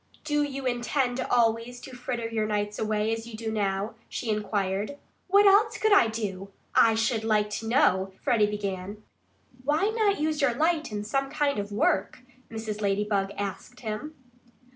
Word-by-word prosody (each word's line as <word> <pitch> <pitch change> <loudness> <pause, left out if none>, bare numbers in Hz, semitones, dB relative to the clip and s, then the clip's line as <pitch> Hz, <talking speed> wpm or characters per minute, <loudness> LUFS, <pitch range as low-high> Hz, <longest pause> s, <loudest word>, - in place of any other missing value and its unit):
"Do 295 -1 +1
you 275 -2 -3
intend 245 +1 0
always 235 0 +1
to 260 -1 -10
fritter 245 -2 -3
your 220 -2 -1
nights 210 0 -2
away 215 0 0
as 225 0 -5
you 235 - -8
do 220 0 -4
now?" 200 0 -1 0.2
she 230 - -3
inquired. 205 +3 -1 0.3
"What 400 +2 +5
else 410 +3 +5
could 435 -1 +3
I 390 - +6
do? 200 -4 -4 0.2
I 225 -1 +5
should 225 0 0
like 210 -1 +1
to 225 +1 -4
know 190 -5 +3
" - - -34
Freddie 210 -3 +3
began. 200 0 -4 0.6
"Why 305 +9 +2
not 435 -3 +1
use 305 0 0
your 255 -4 +2
light 315 -1 +1
in 205 -1 -3
some 270 +5 -1
kind 280 -5 0
of 205 0 -4
work?" 205 +3 0 0.3
Mrs. 220 -2 -5
Ladybug 200 -1 0
asked 200 +5 -5
him. 235 +8 -5
225 Hz, 170 wpm, -27 LUFS, 210-270 Hz, 0.6 s, I